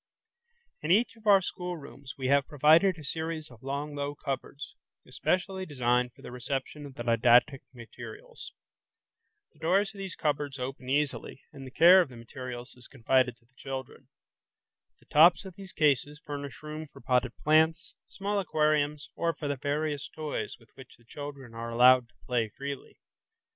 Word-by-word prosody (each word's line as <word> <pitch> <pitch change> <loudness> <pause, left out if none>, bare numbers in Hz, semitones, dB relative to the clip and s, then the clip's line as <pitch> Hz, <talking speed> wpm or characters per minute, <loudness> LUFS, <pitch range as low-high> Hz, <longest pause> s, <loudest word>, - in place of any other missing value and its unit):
In 155 - -4
each 230 +6 +3
of 225 -1 -13
our 195 -2 +7
schoolrooms 165 -8 -7
we 130 - -5
have 140 -1 +3
provided 160 +6 +5
a 155 - -10
series 160 0 -4
of 120 -2 -16
long 140 +2 -4
low 145 0 -3
cupboards, 140 +1 -5 0.3
especially 190 +1 -1
designed 125 -5 0
for - - -18
the - - -8
reception 135 +3 -4
of 135 - -13
the 120 - -5
didactic 120 +4 +4
materials. 120 -2 -10 1.0
The - - -25
doors 195 +6 +2
of 200 - -12
these 190 -1 -5
cupboards 145 -2 -1
open 130 0 -6
easily, 140 -1 -1
and 135 -1 -9
the - - -7
care 175 +8 +7
of 170 - -2
the 125 - -12
materials 125 +1 -8
is 125 -1 -15
confided 130 -1 +1
to 120 - -32
the 125 - -37
children. 130 -1 -7 0.9
The - - -25
tops 170 +6 +6
of 190 - -8
these 195 -2 -11
cases 150 0 +1
furnish 145 -3 -7
room 155 +1 -6
for - - -14
potted 125 0 0
plants, 160 +3 +2 0.2
small 200 +1 -2
aquariums, 150 -4 0
or 170 -1 -1
for 150 - -5
the 145 - 0
various 145 +1 -2
toys 155 -2 -4
with 115 - -22
which 130 - -14
the 115 - -25
children 140 -4 -8
are 115 +1 -5
allowed 125 +1 +6
to 120 - -31
play 120 -3 0
freely. 140 +4 -7
145 Hz, 170 wpm, -29 LUFS, 125-155 Hz, 1.0 s, our